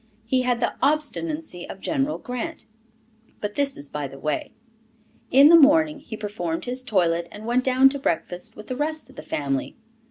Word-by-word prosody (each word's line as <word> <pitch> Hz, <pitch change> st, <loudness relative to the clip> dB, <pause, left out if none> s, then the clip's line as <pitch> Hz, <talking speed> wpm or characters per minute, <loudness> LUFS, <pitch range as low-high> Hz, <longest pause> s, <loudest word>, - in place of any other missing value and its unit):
He 255 Hz, +3 st, +2 dB
had 250 Hz, -1 st, +1 dB
the 235 Hz, -, 0 dB
obstinacy 305 Hz, -, -1 dB
of 195 Hz, -, -8 dB
General 280 Hz, +5 st, -1 dB
Grant. 250 Hz, -2 st, -5 dB, 0.7 s
But 210 Hz, 0 st, -3 dB
this 280 Hz, +1 st, 0 dB
is 145 Hz, -, -5 dB
by 145 Hz, 0 st, -4 dB
the 135 Hz, -, -12 dB
way. 150 Hz, +1 st, -2 dB, 0.8 s
In 275 Hz, +3 st, +7 dB
the 335 Hz, -, +9 dB
morning, 305 Hz, 0 st, +5 dB
he 240 Hz, -7 st, -8 dB
performed 190 Hz, -6 st, -3 dB
his 250 Hz, +1 st, -3 dB
toilet 170 Hz, -8 st, +1 dB
and 210 Hz, +3 st, -9 dB
went 245 Hz, +2 st, +1 dB
down 260 Hz, +1 st, +5 dB
to 280 Hz, +1 st, -4 dB
breakfast 175 Hz, -5 st, -2 dB
with 215 Hz, -, -10 dB
the 255 Hz, -, -4 dB
rest 300 Hz, -2 st, -3 dB
of -, -, -20 dB
the -, -, -7 dB
family. 135 Hz, -2 st, -2 dB
250 Hz, 185 wpm, -24 LUFS, 180-285 Hz, 0.8 s, the